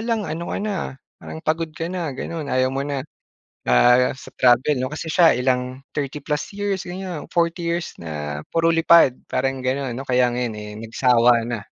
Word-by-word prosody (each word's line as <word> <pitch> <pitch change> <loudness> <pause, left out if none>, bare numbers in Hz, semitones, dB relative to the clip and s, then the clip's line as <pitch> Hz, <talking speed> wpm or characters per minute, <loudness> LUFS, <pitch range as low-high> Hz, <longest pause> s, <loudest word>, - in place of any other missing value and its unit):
lang 225 -4 -1
ano 170 +2 -4
ka - - -2
na, 210 0 -2 0.2
ah, - - -13 0.3
parang 160 - -8
pagod 160 0 0
ka 165 +2 -4
na, 175 -4 -2
gano'n, 155 +2 -5
ayaw 130 0 +2
mo 135 - -2
na." 140 -2 -3 0.6
Ah, 125 - +5
sa - - -12
travel 125 +2 +4
'no 130 - -1
kasi 155 +2 -5
siya 170 -2 +5
ilang 125 +1 -1
30 145 0 -4
plus 150 -1 -2
years 200 -2 -2
ganyan, 180 -3 -6
40 170 0 0
years 170 0 -2
na 75 -2 -5
puro 165 0 +2
lipad 165 -5 +5
parang 135 +1 -1
ganun. 130 0 -1
O 135 - -8
kaya 125 -1 +3
nga 120 - -2
ngayon 120 -3 -2
eh 105 0 -7
nagsawa 120 0 +3
na, 120 -2 -3
135 Hz, 195 wpm, -22 LUFS, 125-165 Hz, 0.6 s, Ah